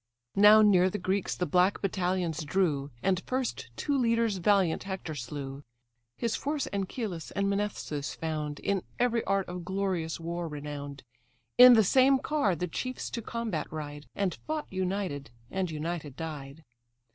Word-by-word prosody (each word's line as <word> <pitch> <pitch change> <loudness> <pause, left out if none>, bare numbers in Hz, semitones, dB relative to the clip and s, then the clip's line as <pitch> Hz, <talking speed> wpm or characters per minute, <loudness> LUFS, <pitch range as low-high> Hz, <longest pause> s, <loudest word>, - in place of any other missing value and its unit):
Now 210 +2 +8
near 185 -3 +5
the 210 - -3
Greeks 190 +1 -1
the 180 - -1
black 180 +4 +3
battalions 180 -4 -1
drew; 150 -4 0
And 185 -1 +2
first 255 - -2
two 285 - -1
leaders 230 -5 +2
valiant 190 -2 +2
Hector 190 -4 -4
slew: 135 +1 -6 0.5
His 230 -2 -1
force 290 0 -2
Anchialus 195 -3 -3
and 200 0 +1
Mnesthes 200 -8 -2
found, 155 -2 -3
In 200 -2 0 0.2
every 240 -1 +2
art 195 0 +1
of 180 0 -6
glorious 185 -3 -2
war 170 +1 -3
renown'd; 145 -2 -6 0.6
In 250 0 +11
the 220 -2 +6
same 265 +6 +5
car 265 - +1
the 180 +3 -2
chiefs 255 +9 -4
to 235 - -3
combat 225 -8 -3
ride, 145 -1 -6
And 195 -3 0
fought 310 0 -2
united, 185 -6 -2 0.2
and 190 -2 -1
united 155 -2 -4
died. 150 -1 -7
185 Hz, 150 wpm, -29 LUFS, 155-210 Hz, 0.6 s, In